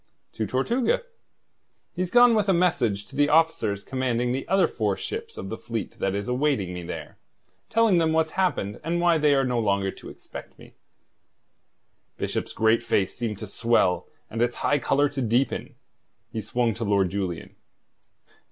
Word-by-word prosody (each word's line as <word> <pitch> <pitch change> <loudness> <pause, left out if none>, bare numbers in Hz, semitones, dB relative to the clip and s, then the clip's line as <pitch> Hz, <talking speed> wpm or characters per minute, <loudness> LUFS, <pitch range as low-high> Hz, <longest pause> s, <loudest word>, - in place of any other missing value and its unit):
"To 110 - -2
Tortuga. 235 - +1 0.9
He's 180 0 -2
gone 245 +2 +6
with 210 -3 +2
a - - +5
message 120 - +1
to - - -15
the 145 0 +3
officers 145 -11 +2
commanding 125 -2 -1
the 135 +2 -3
other 195 -2 +4
four 105 -8 -1
ships - - -6
of 95 - -6
the 110 - -5
fleet 115 -3 -5
that 95 0 0
is 100 0 -3
awaiting 125 -7 0
me 90 - -5
there, 85 - -8 0.5
telling 225 -5 +4
them 160 -1 +2
what's 160 0 +1
happened 175 - -1
and 170 +2 -1
why 170 -2 +3
they 150 -1 +4
are 135 - +3
no 125 -2 0
longer 100 -3 +1
to - - -11
expect - - -11
me." - - -15 1.4
Bishop's - - -3
great 110 +1 +3
face 100 -5 0
seemed 115 -4 -3
to 110 - -6
swell 110 -3 +1 0.2
and 115 - -4
its 120 0 +1
high 145 - +3
colour 145 +2 +2
to 140 -1 -4
deepen. 120 +3 0 0.6
He 110 - -3
swung 115 +2 0
to 115 +3 -5
Lord 100 -4 +2
Julian. 95 -4 -4
120 Hz, 170 wpm, -25 LUFS, 105-160 Hz, 1.4 s, gone